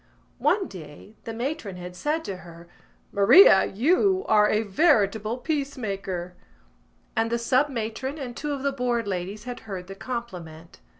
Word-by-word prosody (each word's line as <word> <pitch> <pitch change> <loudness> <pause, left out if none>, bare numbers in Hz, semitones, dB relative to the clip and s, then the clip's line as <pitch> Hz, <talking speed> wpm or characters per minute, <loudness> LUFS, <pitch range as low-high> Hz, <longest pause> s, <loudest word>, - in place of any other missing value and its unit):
One 395 -2 +2
day 160 +3 -11
the 230 - -4
matron 235 - -4
had 180 0 -8
said 310 - -2
to 195 - -4
her: 170 -1 -13 0.4
"Maria, 200 - +7
you 370 - +2
are 210 -1 +5
a 215 +1 +2
veritable 215 - +2
peace 285 0 -2
maker!" 195 -5 -4 0.8
And 225 0 +1
the 235 - +2
sub 255 +5 +2
matron 255 +3 -4
and 250 -5 -6
two 295 +3 -4
of 275 -2 -4
the 280 - +1
Board 245 -4 -1
ladies 195 +2 -4
had 245 0 -6
heard 185 -2 -5
the 195 - -8
compliment. 180 -8 -7
225 Hz, 160 wpm, -25 LUFS, 190-270 Hz, 0.8 s, Maria